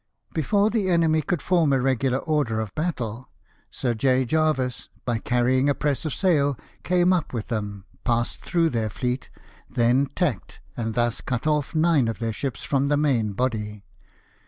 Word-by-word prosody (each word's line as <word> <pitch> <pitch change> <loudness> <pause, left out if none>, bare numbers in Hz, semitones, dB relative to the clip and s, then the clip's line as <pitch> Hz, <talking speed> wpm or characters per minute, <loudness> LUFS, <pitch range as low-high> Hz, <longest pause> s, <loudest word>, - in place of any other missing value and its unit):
Before 200 +7 +2
the 210 -5 0
enemy 165 -3 +3
could 155 +1 -2
form 170 -5 +3
a 135 - +3
regular 130 0 +1
order 145 -7 0
of 110 -3 -4
battle, 125 -8 -3 0.4
Sir 120 -2 -1
J. 130 +2 +2
Jervis, 140 -4 0 0.2
by 120 -2 0
carrying 130 +3 +2
a 140 - +2
press 145 0 -1
of 155 - -1
sail, 145 -8 +2 0.2
came 180 0 +3
up 170 -7 -1
with 115 -3 -4
them, 105 -4 -4 0.2
passed 120 -1 0
through 170 -2 +1
their 115 -3 -1
fleet, 125 +5 -3 0.4
then 125 +3 +2
tacked, 140 - -2 0.2
and 115 -2 -3
thus 120 -1 0
cut 125 -1 -3
off 150 0 0
nine 155 -6 +3
of 115 - -2
their 115 -1 -2
ships 135 +3 -4
from 140 0 +1
the 145 0 +2
main 125 -8 +1
body. 105 -3 -2
130 Hz, 170 wpm, -24 LUFS, 115-155 Hz, 0.4 s, enemy